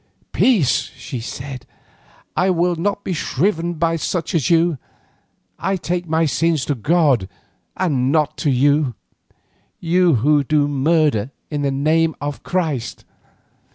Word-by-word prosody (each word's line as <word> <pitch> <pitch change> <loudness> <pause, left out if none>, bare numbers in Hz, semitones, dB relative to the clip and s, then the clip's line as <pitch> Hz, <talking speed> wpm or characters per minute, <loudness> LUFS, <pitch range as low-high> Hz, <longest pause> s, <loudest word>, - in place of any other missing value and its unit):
"Peace!" 165 - +2
she 125 - -6
said, 130 +3 -7 0.7
"I 185 - +2
will 175 0 +1
not 200 +4 -2
be 185 - -2
shriven 170 +2 -1
by 165 +1 0
such 165 +2 -3
as 165 -1 +1
you. 165 -3 +3 0.8
I 195 - 0
take 175 0 -3
my 160 +1 +2
sins 160 -1 +1
to 145 - 0
God 140 - +2 0.5
and 135 -8 +1
not 150 -2 +1
to 150 - 0
you—you 140 0 +2 1.2
who 145 +5 +3
do 145 +1 +2
murder 145 -5 +1 0.2
in 145 -1 -2
the 140 - +1
name 155 +4 +1
of 145 0 -5
Christ." 155 -10 -3
155 Hz, 130 wpm, -20 LUFS, 140-170 Hz, 1.2 s, you